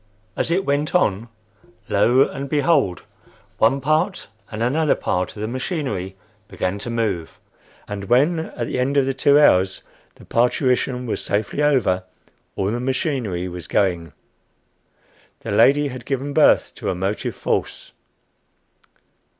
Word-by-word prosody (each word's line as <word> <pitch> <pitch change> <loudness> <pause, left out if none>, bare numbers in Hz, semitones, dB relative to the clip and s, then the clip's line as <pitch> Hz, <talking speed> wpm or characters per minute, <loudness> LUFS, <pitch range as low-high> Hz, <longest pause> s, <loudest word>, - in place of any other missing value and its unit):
As - - -1
it 185 +3 +1
went 145 +4 -1
on, 115 - +1 0.6
lo 120 +6 +4
and 140 0 -6
behold! 145 - +1 0.6
one 120 +5 +3
part 155 - 0 0.2
and 110 +1 -4
another 150 +5 +2
part 90 0 -2
of 105 - -6
the - - -2
machinery 125 - -3 0.3
began 95 +1 -3
to 120 - -6
move! 105 -8 -2 0.5
And 100 -1 -5
when, 145 - +3
at 130 -7 -5
the 125 - -3
end 135 +3 0
of 140 - +4
the 135 - -1
two 140 +2 +4
hours, 95 -9 +3 0.3
the - - -16
parturition 125 +1 +1
was 115 - -3
safely 105 +7 -1
over, 125 -11 +2 0.5
all 95 +1 -1
the 120 - -2
machinery 125 - -2
was 90 -1 -8
going! 85 -6 0 1.3
The - - -5
lady 145 +1 +4
had 130 -2 -8
given 140 +1 -3
birth - - +4
to - - -3
a 95 - -1
Motive 95 +4 -3
Force. - - -3
125 Hz, 140 wpm, -21 LUFS, 100-140 Hz, 1.3 s, lo